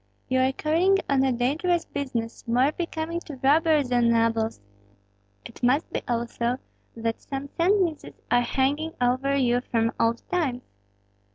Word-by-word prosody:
"You 260 0 +2
are 260 +1 +3
carrying 335 +8 +2
on 270 -1 +2
a 265 - +2
dangerous 310 +9 0
business, 240 -5 -4
more 250 +5 +3
becoming 335 0 -3
to 310 -4 -9
robbers 300 -1 +3
than 240 -1 +3
nobles. 230 -1 +1 0.9
It - - -11
must 260 +6 +1
be, - - -1
also, 235 +1 -1 0.4
that 230 0 -3
some 275 0 -6
sentences 350 -3 +1 0.2
are 245 - +5
hanging 285 +6 0
over 255 +3 +1
you 245 -3 +2
from 230 -1 +1
old 230 +1 +1
times?" 270 -9 -1
265 Hz, 145 wpm, -25 LUFS, 240-315 Hz, 0.9 s, are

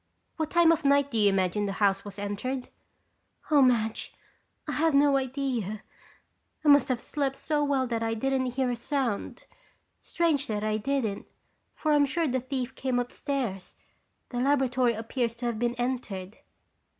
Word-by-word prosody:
"What 315 -1 -1
time 340 -1 +5
of 330 -1 +1
night 280 0 +3
do 230 - -1
you 205 -1 +5
imagine 195 +1 0
the 195 - -2
house 195 -1 +1
was 205 -1 -9
entered?" 205 +6 -4 0.8
"Oh, 295 -2 +6
Madge, 230 -4 +1 0.5
I - - -2
have 320 -1 +2
no 285 0 +5
idea. 255 -6 -2 0.8
I - - +5
must 285 -3 +6
have 250 -2 0
slept 275 0 -2
so 300 0 0
well 275 -2 +1
that 230 -2 -2
I 225 0 -1
didn't 265 +2 0
hear 260 -2 +1
a - - -1
sound. 240 -3 -3 0.5
Strange 320 -5 0
that 210 -1 -2
I 215 0 0
didn't, 225 -3 -2 0.5
for 310 - 0
I'm 290 -1 +4
sure 330 +4 0
the 260 -1 0
thief 260 0 -4
came 260 -1 -1
upstairs. 245 -5 -3 0.5
The 245 - -3
laboratory 255 -2 +2
appears 230 +1 -2
to 240 +1 -6
have 235 -2 -2
been 240 0 0
entered." 235 -6 -4
255 Hz, 165 wpm, -28 LUFS, 220-280 Hz, 0.8 s, Oh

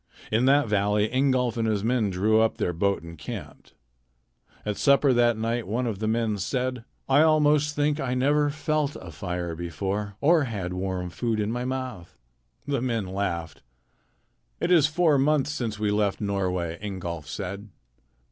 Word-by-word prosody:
In 115 +4 +3
that 140 -1 +4
valley 105 0 +1
Ingolf 130 -2 +1
and 115 -1 0
his 105 -2 0
men 115 -2 +1
drew 105 +4 +2
up 110 - +1
their 90 - -1
boat 100 +2 0
and 85 0 -9
camped. - - -8 0.9
At 105 -1 -1
supper 140 -1 +4
that 120 -2 +3
night 115 +1 -2
one 120 +5 -1
of 110 -5 -3
the 110 - -1
men 110 -2 0
said: 125 +4 -2 0.2
"I 135 +2 +5
almost 150 -1 +3
think 150 +1 +1
I 130 -3 -1
never 145 +3 +2
felt 150 0 -1
a 90 -3 -9
fire 85 +1 -4
before 95 +5 -3
or 155 0 +4
had 100 -7 -4
warm 90 -1 -3
food 115 +2 -1
in 105 +1 0
my 120 +1 -2
mouth." 130 -8 -5 0.5
The 140 -3 -1
men 115 -5 -1
laughed. 90 -4 -3 1.0
"It 175 - 0
is 160 -5 +6
four 155 -2 +3
months 145 +1 +2
since 115 -7 -3
we 105 -1 0
left 105 -1 +1
Norway," 90 -5 -2
Ingolf 90 -6 -5
said. 100 +4 -6
110 Hz, 165 wpm, -26 LUFS, 95-135 Hz, 1.0 s, is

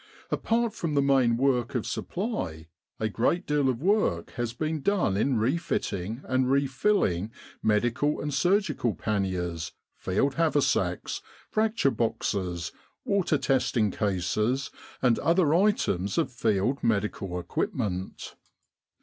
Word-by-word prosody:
Apart 230 -1 +1
from 155 -3 -3
the 140 - +4
main 130 -4 +3
work 125 -2 +1
of 120 - 0
supply 175 - -3 0.3
a 110 - +1
great 125 - 0
deal 145 -2 +2
of 125 +2 -2
work 190 - +1
has 120 -1 -3
been 155 +5 -2
done 190 - +1
in 125 +5 +1
refitting 110 - -1
and 130 0 +1
refilling 135 - +1 0.3
Medical 120 +7 +1
and 145 -1 -3
Surgical 155 - +1
Panniers, 90 -6 -2 0.2
Field 130 +9 0
Haversacks, 145 - +1 0.3
Fracture 215 -9 +2
Boxes, 95 -8 -2 0.3
Water 190 -6 +2
testing 125 -6 +1
Cases, 105 +8 0 0.3
and 120 -3 +4
other 165 -1 +3
items 165 - +1
of 165 -5 +1
Field 115 +2 0
medical 100 -4 0
equipment. 95 - -3
125 Hz, 115 wpm, -27 LUFS, 100-155 Hz, 0.3 s, the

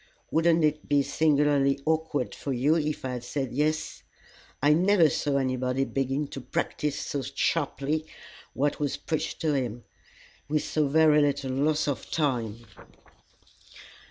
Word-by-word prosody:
Wouldn't 165 0 +3
it 150 0 0
be 145 -1 +3
singularly 140 -1 +2
awkward 160 -4 0
for 140 - -5
you 135 +5 +2
if 150 -3 -2
I - - -2
had 125 -1 -5
said 135 +1 -3
'Yes'? 155 +3 -1 0.6
I 145 +2 +4
never 175 -1 +4
saw 140 -1 0
anybody 130 0 0
begin 135 +2 -1
to 135 - -7
practise 145 +3 -2
so 140 - -3
sharply 145 +2 -1 0.5
what 145 +2 0
was 145 -2 -1
preached 155 0 -3
to 155 -3 +1
him 120 -4 -2 0.7
with 150 0 +1
so 155 -2 0
very 150 +1 +5
little 140 -2 0
loss 150 +4 +1
of 140 -5 -3
time!" 120 -7 -1
145 Hz, 140 wpm, -27 LUFS, 135-155 Hz, 0.7 s, very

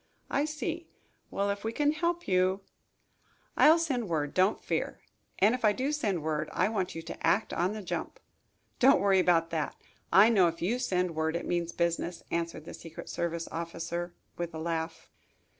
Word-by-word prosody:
"I 280 +2 +2
see. 320 +2 -4 0.4
Well, 200 0 0
if 200 0 -5
we 225 - -1
can 295 +5 +2
help 340 +3 -1
you 185 +1 +2 0.5
" - - -38
"I'll 315 +2 +7
send 265 - -1
word, 150 -3 -1
don't 185 +2 +3
fear. - - -2 0.4
And 210 +4 +4
if 250 - -3
I 210 -1 +5
do 265 +6 -1
send 205 - -1
word, 155 -1 -1
I - - +1
want 190 -6 -2
you 165 - -5
to - - -4
act 215 - +2
on 180 +4 0
the 215 -1 -6
jump." 175 - -4 0.6
"Don't 270 +3 +6
worry 195 -1 +4
about 165 -2 +3
that. 160 -3 -2 0.4
I 200 +3 +8
know 195 -6 +5
if 165 0 -3
you 220 +9 0
send 180 -8 0
word 160 +1 -1
it 170 - -3
means 170 -1 -1
business," 170 0 -1
answered 165 -2 -2
the - - -8
secret 165 -1 -9
service 170 -1 -2
officer, 170 +1 -4 0.2
with 170 -1 -4
a - - -4
laugh. 160 0 -3
180 Hz, 190 wpm, -30 LUFS, 165-225 Hz, 0.6 s, I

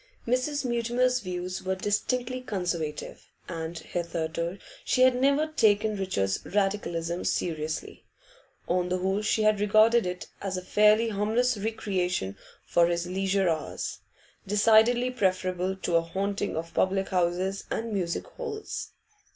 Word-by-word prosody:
Mrs. 255 +4 0
Mutimer's 245 +1 +1
views 185 -3 -4
were 190 0 0
distinctly 245 +6 -1
Conservative, 175 -9 -4 0.2
and 165 -1 -5
hitherto 170 +1 -3 0.3
she 255 - +3
had 255 0 +6
never 280 +4 +3
taken 215 -8 +2
Richard's 140 - -1
Radicalism 180 -4 -1
seriously; 155 -2 -3 0.6
on 180 0 +1
the 185 - +1
whole 190 +3 0
she 215 0 +1
had 215 -1 +3
regarded 215 +1 +4
it 180 0 -4 0.2
as 190 -2 -2
a 185 - -5
fairly 215 +4 +4
harmless 220 +4 +1
recreation 185 - -2 0.3
for 170 0 +4
his 170 0 -1
leisure 190 +1 0
hours 160 -2 -2 0.5
decidedly 225 +4 +4
preferable 185 -4 0
to 175 -3 +1
a - - +3
haunting 200 +3 -2
of 165 +1 -5
public 190 +1 +1
houses 185 +1 0
and 225 -1 -3
music 175 -4 -1
halls. 465 -4 -6
195 Hz, 130 wpm, -27 LUFS, 180-225 Hz, 0.6 s, had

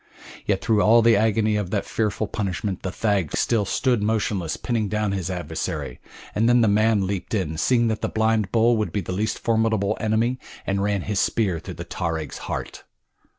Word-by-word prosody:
Yet 100 -2 +1
through 110 -3 +3
all 115 +2 +5
the 115 0 +6
agony 110 0 +2
of 100 -4 -2
that 100 0 -1
fearful 110 0 -1
punishment 100 -2 -3
the 95 - -3
thag 100 -7 0
still 110 -4 +1
stood 125 +2 +1
motionless 105 -5 -1
pinning 115 -4 -1
down 105 -1 0
his 95 -2 -2
adversary, 80 -7 -4 0.3
and 115 +3 +2
then 120 0 +5
the 115 - +4
man 105 -1 +3
leaped 100 +3 -3
in, 85 -6 -1
seeing 120 +2 +3
that 110 -1 -2
the - - -1
blind 110 -3 +1
bull 115 +1 +4
would 110 - -1
be 100 - -1
the 90 - -6
least 105 +4 -1
formidable 110 -3 +1
enemy, 115 +4 0 0.3
and 100 0 0
ran 100 -1 0
his 105 -1 -1
spear 95 -7 +1
through - - -8
the - - -7
tarag's 80 -3 -4
heart. - - -5
105 Hz, 195 wpm, -23 LUFS, 95-110 Hz, 0.3 s, the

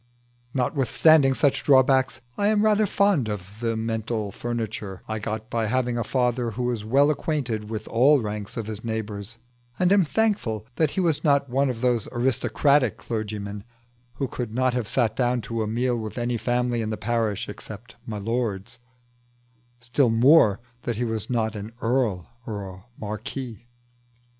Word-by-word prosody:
Notwithstanding 135 +2 +4
such 135 +3 +2
drawbacks 130 -1 +4
I 205 - +1
am 210 0 +3
rather 215 -1 +4
fond 190 - +2
of 100 0 -6
the 115 -1 0
mental 110 -1 -2
furniture 110 -4 -4
I 110 0 -3
got 110 +1 -5
by 115 -2 0
having 125 +1 0
a 120 - 0
father 125 -1 0
who 115 +3 -4
was 120 -3 -1
well 140 +7 +4
acquainted 125 -9 -2
with 110 -1 -5
all 135 +5 +5
ranks 105 -2 -5
of 115 - -3
his 110 0 -6
neighbours, 110 -1 -4 0.4
and 185 +1 +3
am 200 -2 +5
thankful 160 - 0
that 160 -3 +3
he - - +3
was 165 -5 +1
not 140 -3 +2
one 135 +2 +2
of 120 -2 -4
those 120 -4 +1
aristocratic 130 +1 +2
clergymen 105 -3 -4 0.5
who 135 - -2
could 120 -3 -5
not 130 0 +2
have 125 -4 -2
sat 120 -3 +1
down 125 -1 +1
to 115 +1 -3
a 110 - -1
meal 120 +2 0
with 110 +1 -6
any 120 0 -1
family 120 0 0
in 110 - -2
the 110 - -3
parish 115 -2 -1
except 110 +3 -9
my 110 -2 -4
lord's 105 -2 -3 1.0
still 125 +2 +2
more 115 -2 +5 0.2
that 120 -1 -2
he 120 +3 -1
was 110 -2 -3
not 110 -3 0
an 105 +2 -7
earl 115 - 0 0.2
or 100 -3 -4
a 95 0 -11 0.2
marquis. 110 +2 -6
120 Hz, 165 wpm, -25 LUFS, 110-130 Hz, 1.0 s, all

